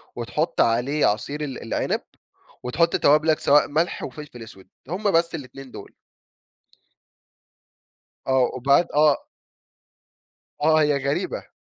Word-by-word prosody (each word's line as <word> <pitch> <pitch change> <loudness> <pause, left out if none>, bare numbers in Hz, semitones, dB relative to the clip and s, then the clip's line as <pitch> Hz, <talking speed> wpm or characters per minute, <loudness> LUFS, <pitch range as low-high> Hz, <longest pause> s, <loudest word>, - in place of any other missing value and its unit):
وتحط 150 +8 -1
عليه 125 +6 +1
عصير 140 +8 -1
ال 135 -3 -6
العنب 115 - -2 0.6
وتحط 165 +7 +1
توابلك؛ 155 +2 +3
سواء 145 +1 +4
ملح 160 +4 -1
وفلفل 150 -6 -9
أسود، 95 -4 -14 0.2
هم 200 +4 -1
بس 165 -1 +1
ال2 135 -2 -10
دول. - - -11 2.3
آه، 130 -2 +2
وبعد 140 +7 +3
آه. 150 -1 +3 1.4
آه 155 +1 +4
هي 150 -1 +2
غريبة. 140 +1 -3
145 Hz, 110 wpm, -23 LUFS, 130-155 Hz, 2.3 s, سواء